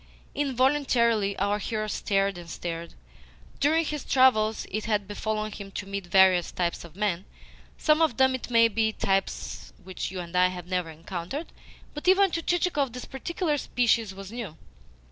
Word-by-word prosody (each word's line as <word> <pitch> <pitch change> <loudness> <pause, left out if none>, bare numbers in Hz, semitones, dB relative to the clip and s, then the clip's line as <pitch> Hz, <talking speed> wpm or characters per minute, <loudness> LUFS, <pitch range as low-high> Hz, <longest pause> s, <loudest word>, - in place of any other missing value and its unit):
Involuntarily 255 -6 +2
our 200 +2 0
hero 215 0 -2
started 195 -2 0
and 170 -1 -11
stared. 170 -1 -5 0.6
During 320 +3 +3
his 300 -2 -3
travels 220 -5 +3
it 215 +2 -2
had 210 -3 0
befallen 215 +1 -3
him 200 -1 -8
to 200 - -4
meet 200 -2 -5
various 185 -1 +5
types 175 -1 -2
of 170 -1 -13
men 195 -3 -1 0.5
some 310 +1 +3
of 310 -8 +2
them, 265 0 +4
it 260 - -5
may 230 -1 +6
be, 220 0 0
types 65 - -2
which 185 0 -5
you 185 0 -6
and 175 0 -7
I 180 0 +5
have 180 -1 -6
never 180 -2 -2
encountered; 175 - -6 0.4
but 295 +4 -7
even 380 0 +5
to 330 - -1
Chichikov 330 -8 0
this 250 - -6
particular 300 +2 -2
species 230 -5 +1
was 195 0 -9
new. 220 -9 -6
215 Hz, 165 wpm, -27 LUFS, 185-260 Hz, 0.6 s, may